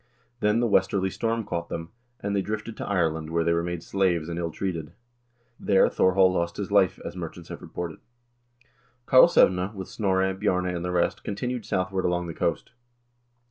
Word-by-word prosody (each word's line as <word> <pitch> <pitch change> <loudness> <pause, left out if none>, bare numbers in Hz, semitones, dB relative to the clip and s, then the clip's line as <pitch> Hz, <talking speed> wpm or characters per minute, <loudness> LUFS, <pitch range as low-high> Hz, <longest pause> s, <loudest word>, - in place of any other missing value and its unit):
Then 105 +1 +2
the - - +2
westerly 95 -2 +2
storm 115 +1 -1
caught 85 -3 -4
them, 80 0 -5 0.3
and 100 0 -2
they 100 - +2
drifted 110 +2 -4
to - - -5
Ireland, 80 -5 0
where 85 0 +1
they 85 - +2
were 85 - +1
made 85 -1 -4
slaves 90 -4 0
and 85 0 -3
ill 85 -1 -2
treated. 85 -3 -4 0.7
There 95 -1 +4
Thorhall 95 0 +4
lost 85 -1 -1
his 100 -1 -4
life, 100 -3 +3
as - - -6
merchants 85 -1 -7
have - - -7
reported. 85 -2 -6 1.1
"Karlsevne, 100 - +5
with 95 -1 -6
Snorre, 95 -2 +1
Bjarne, 95 -2 0
and 85 - -4
the 90 - -2
rest, 90 -1 0
continued 120 +3 -3
southward 95 0 -1
along 90 0 0
the 85 - -5
coast. - - -2
95 Hz, 180 wpm, -26 LUFS, 85-100 Hz, 1.1 s, Karlsevne